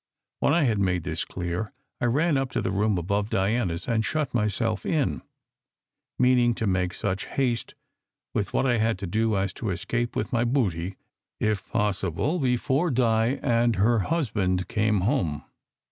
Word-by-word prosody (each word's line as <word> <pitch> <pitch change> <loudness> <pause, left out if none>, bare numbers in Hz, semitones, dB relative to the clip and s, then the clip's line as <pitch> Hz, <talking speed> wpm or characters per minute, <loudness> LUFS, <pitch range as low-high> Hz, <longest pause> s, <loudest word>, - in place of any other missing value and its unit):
When - - +2
I 165 +1 +3
had 115 -6 +2
made 90 -3 +1
this - - -2
clear, 90 +6 -4 0.3
I - - +2
ran 145 +7 +2
up 135 -1 0
to - - 0
the 95 - -1
room 100 +1 +1
above 100 +4 -1
Diana 100 -2 +1
s 85 - -8
and 115 -2 +1
shut 155 +2 -1
myself 105 -2 0
in, 150 -4 0 1.0
meaning 125 -1 +4
to 110 - -2
make 90 -2 0
such 95 -1 -2
haste 125 -4 -1 0.6
with 100 -2 -1
what - - +1
I 120 -3 +2
had 110 -2 +1
to 100 - -5
do 110 +3 +1
as 95 -1 -1
to 110 - -4
escape 120 +6 -2
with 105 - -2
my 120 0 +2
booty, 95 -8 0 0.4
if 105 -2 -1
possible, 105 - 0
before 130 +5 +1
Di 120 -1 +2
and 120 -3 +2
her 110 +4 +3
husband 100 - 0
came 105 -3 +1
home. 85 - 0
110 Hz, 170 wpm, -26 LUFS, 95-120 Hz, 1.0 s, meaning